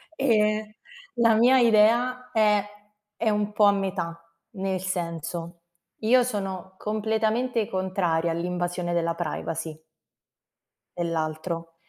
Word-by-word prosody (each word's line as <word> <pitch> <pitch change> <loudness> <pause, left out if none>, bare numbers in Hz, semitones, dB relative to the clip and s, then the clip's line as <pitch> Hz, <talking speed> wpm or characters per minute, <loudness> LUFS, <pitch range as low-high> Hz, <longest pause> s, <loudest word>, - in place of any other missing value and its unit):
ehm, 215 -4 +1 0.4
la 230 -1 +4
mia 245 +4 +5
idea 240 +3 +3
è 210 -3 +3 0.6
è 225 - +2
un 210 0 0
po' 210 0 +1
a 200 - +7
metà, 190 -4 -2 0.4
nel 190 -1 -1
senso, 170 -2 -4 0.4
io 250 +4 +5
sono 195 -5 -4
completamente 220 +2 0
contraria 185 -3 0
all'invasione 175 +1 -2
della 170 -1 0
privacy 165 -1 -4 1.2
dell'altro, 165 0 -3
195 Hz, 100 wpm, -25 LUFS, 170-220 Hz, 1.2 s, a